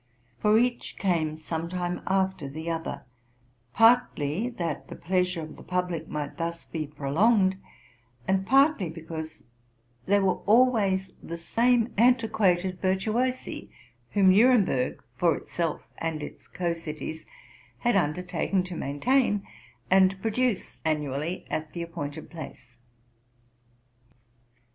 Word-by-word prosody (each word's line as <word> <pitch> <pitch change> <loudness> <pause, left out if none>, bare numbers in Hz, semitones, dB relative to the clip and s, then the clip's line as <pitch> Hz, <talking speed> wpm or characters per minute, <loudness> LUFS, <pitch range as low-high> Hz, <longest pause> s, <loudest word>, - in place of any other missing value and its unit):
For 210 0 +4
each 245 +1 0
came 160 -5 0
some 160 +1 -4
time 180 0 -3
after 190 -6 0
the 160 +4 -4
other, 165 0 -4 0.7
partly 225 -5 +3
that 170 - -4
the - - -8
pleasure 180 -1 0
of 155 - -9
the - - -12
public 180 -3 -2
might 150 -1 -5
thus 170 0 -4
be 155 -3 -4
prolonged, 190 +8 +2 0.7
and 190 0 +2
partly 270 - +4
because 160 -1 -7 0.6
they 200 +2 +5
were 195 -2 +1
always 210 -5 +3
the 170 - -6
same 230 +6 +2
antiquated 205 -7 +3
virtuosi 220 +7 -1 0.4
whom 195 -2 +6
Nuremburg, 205 - +3
for 165 0 +3
itself 165 -3 -4
and 160 -2 -2
its - - -10
co 175 -2 -2
cities, 160 -1 -6 0.6
had 240 -2 +2
undertaken 180 +2 0
to 185 -1 -7
maintain, 205 - +1 0.5
and 190 0 +5
produce 225 0 -1
annually 155 +2 -2
at 155 -1 -3
the 170 - -3
appointed 165 -4 -6
place. 135 -6 -10
180 Hz, 115 wpm, -27 LUFS, 160-205 Hz, 0.7 s, whom